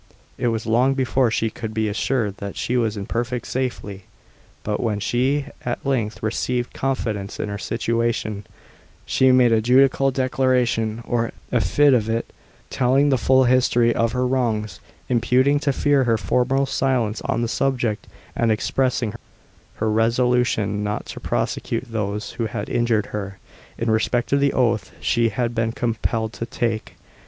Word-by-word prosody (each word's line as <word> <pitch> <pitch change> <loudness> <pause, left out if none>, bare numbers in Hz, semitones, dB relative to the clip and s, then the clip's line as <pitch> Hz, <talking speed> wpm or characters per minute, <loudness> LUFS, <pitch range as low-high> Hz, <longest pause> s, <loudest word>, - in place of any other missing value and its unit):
It - - -1
was 115 -1 -1
long 125 +4 +3
before 130 -1 +2
she 110 0 0
could 110 -1 -6
be 110 -1 +1
assured 105 0 -1
that 100 -1 -6
she 125 - -1
was 110 -3 0
in 100 - -4
perfect 120 +2 -3
safely. 105 -7 -4 0.6
But 105 -1 -2
when 105 -3 -1
she 130 +7 0 0.2
at 120 +2 -4
length 115 -7 -1
received 120 +2 -1
confidence 110 -7 -3
in 105 - -2
her 100 0 -4
situation, 115 -3 -2 0.6
she 130 0 +3
made 125 -2 +5
a 110 -1 +3
judicial 135 +3 +4
declaration, 125 -4 0
or 115 -1 0 0.2
affidavit, 115 +1 +2 0.4
telling 135 +3 +3
the 135 - +3
full 130 +2 +4
history 120 -2 +3
of 115 0 0
her 125 0 0
wrongs, 110 -7 -1 0.3
imputing 130 +4 +3
to 140 -1 +1
fear 140 0 +2
her 115 -2 +2
former 135 +4 +1
silence 125 -5 0
on 120 - -1
the - - 0
subject, 120 -3 -1 0.3
and 115 -1 +2
expressing 120 0 0 0.6
her 110 0 -1
resolution 115 -2 +1
not 105 0 -3
to - - -8
prosecute 130 - -2
those 105 -1 -3
who 115 -1 -3
had - - -5
injured 115 -3 +1
her, 100 -2 -4 0.4
in 115 -1 0
respect 120 +3 0
of 140 - +4
the 140 0 +2
oath 115 -4 0
she 115 -1 +2
had 120 +2 -2
been 115 -1 0
compelled 115 -1 -2
to 115 - -5
take. 115 -2 -3
120 Hz, 155 wpm, -22 LUFS, 110-130 Hz, 0.6 s, made